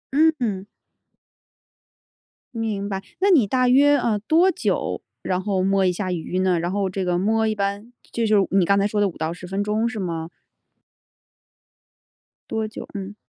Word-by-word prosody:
嗯 320 +2 +5
嗯。 200 -5 -2 1.9
明 210 -3 -2
白， 195 -1 -3 0.2
那 390 +2 +3
你 260 - +5
大 255 +3 +2
约， 285 +3 +5
呃， 230 -5 0
多 330 - +3
久， - - -2 0.2
然 185 0 -1
后 190 -2 -1
摸 195 0 +2
一 180 - +3
下 185 +1 -3
鱼 180 +1 -3
呢？ 185 -2 +2
然 175 +2 -2
后 200 -1 0
这 190 0 -3
个 175 -1 0
摸 220 +4 +1
一 215 - -1
般 200 +3 -3 0.2
就 230 - -1
是 215 - +3 0.2
你 195 -2 +4
刚 200 +3 +3
才 200 - +2
说 210 0 0
的 200 - +3
5 - - -12
到 160 +1 -2
10 180 +1 -10
分 195 +2 -2
钟 215 +3 0
是 230 - -7
吗？ 165 -3 -4 2.2
多 220 -1 -2
久， 215 - -8
嗯。 200 0 -6
200 Hz, 180 characters per minute, -22 LUFS, 185-225 Hz, 2.2 s, 嗯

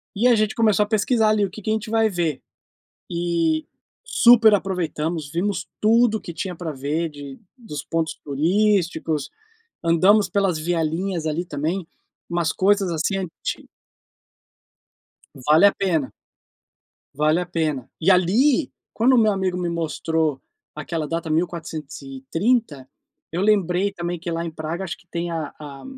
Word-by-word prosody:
e 225 +5 +3
a 245 - +6
gente 215 -1 0
começou 215 -3 +3
a - - -6
pesquisar 220 +1 +2
ali 215 -1 +3
o - - -5
que 215 - -10
que 215 - -4
a - - +3
gente 220 0 -3
vai 225 0 +3
ver, 170 -6 -2 0.7
e 170 -2 0 0.4
super 235 - +6
aproveitamos, 165 -5 -2
vimos 175 +1 -2
tudo 225 +1 +4
o - - -13
que 170 - -8
tinha 180 +2 -4
pra 165 -1 -5
ver 150 +4 -2
de 145 -2 -10 0.2
dos 220 - -7
pontos 165 -1 -2
turísticos, 165 -1 +1 0.5
andamos 185 +5 +4
pelas 195 -3 +1
vielinhas 165 +2 -1
ali 160 +3 -1
também, 160 +4 -3 0.4
umas 170 -2 0
coisas 195 -1 +2
assim 170 +4 -1
anti 185 -4 -5 1.7
Vale 150 +8 +4
a - - -1
pena. 165 -8 -1 1.0
Vale 155 +4 +2
a 180 - -3
pena. 155 -7 -2
E 170 +4 +3
ali, 235 - +3 0.2
quando 250 +4 +3
o - - +5
meu 215 -2 +4
amigo 190 -2 -1
me 180 -1 -2
mostrou 160 -3 -1 0.3
aquela 155 0 -4
data 165 0 -3
1430, 155 - -2 0.4
eu 170 - -2
lembrei 200 -2 +2
também 175 -2 -4
que 170 +1 -5
lá 165 0 -2
em 170 - -4
Praga 160 +4 -5
acho 190 +1 -5
que 180 - -24
tem 170 0 -3
a 160 -3 -4
a 145 -2 -10
175 Hz, 150 wpm, -22 LUFS, 160-200 Hz, 1.7 s, a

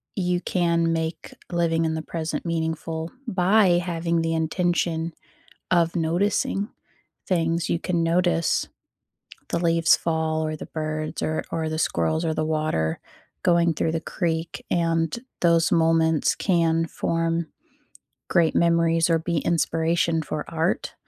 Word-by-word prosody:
you 180 -2 0
can 170 -2 +1
make 160 0 -3 0.2
living 165 -1 +1
in 160 - 0
the 160 - -2
present 160 +1 -4
meaningful 160 0 -3 0.2
by 185 -2 +4
having 170 -1 -1
the 165 0 0
intention 165 0 0 0.6
of 170 -1 +3
noticing 195 +5 0 0.6
things, 165 -2 0
you 170 - +1
can 170 -2 0
notice 170 0 +1 0.8
the 170 - 0
leaves 165 -1 +4
fall 160 -1 -1
or 155 0 -2
the - - -8
birds 155 -1 -4
or 155 0 -1
or 160 -1 -1
the 155 0 -3
squirrels 160 +1 0
or 160 - 0
the 155 - -1
water 155 - -1 0.4
going 170 -1 +3
through 160 +1 -1
the 165 - -1
creek, 165 -2 -3
and 165 +2 +1 0.2
those 170 -2 +3
moments 160 -1 +3
can 165 -3 +2
form 165 0 -1 0.8
great 165 -2 +3
memories 165 -1 +3
or 165 - +4
be 165 +1 -2
inspiration 165 0 +1
for 150 0 -4
art. 165 +2 -1
165 Hz, 135 wpm, -24 LUFS, 160-170 Hz, 0.8 s, by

